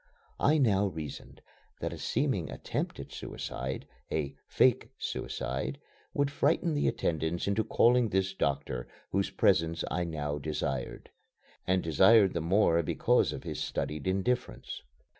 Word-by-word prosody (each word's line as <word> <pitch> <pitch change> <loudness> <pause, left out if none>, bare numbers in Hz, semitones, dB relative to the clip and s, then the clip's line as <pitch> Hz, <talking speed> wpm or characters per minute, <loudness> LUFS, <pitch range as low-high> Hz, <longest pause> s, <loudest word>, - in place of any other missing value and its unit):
I 150 +2 +4
now 105 -8 +3
reasoned 80 -6 -7 0.4
that - - -3
a - - -7
seeming - - 0
attempt - - -3
at - - -8
suicide, 65 +1 -5 0.3
a 75 -3 -1
"fake" - - +3
suicide, 65 - -3 0.3
would 145 -1 +1
frighten 155 +3 +2
the 145 - +1
attendants 80 +2 -1
into 100 +2 +2
calling 120 +2 +4
this 95 0 0
doctor 70 -7 -1 0.2
whose 95 0 +1
presence 85 0 +2
I 90 - 0
now 75 -3 -3
desired 70 -4 -3 0.6
and 95 0 +2
desired 95 +5 +6
the 85 - -1
more 85 0 +3
because 80 - +2
of - - -6
his - - -4
studied 75 +1 -3
indifference. 95 - -1
85 Hz, 135 wpm, -30 LUFS, 75-105 Hz, 0.6 s, desired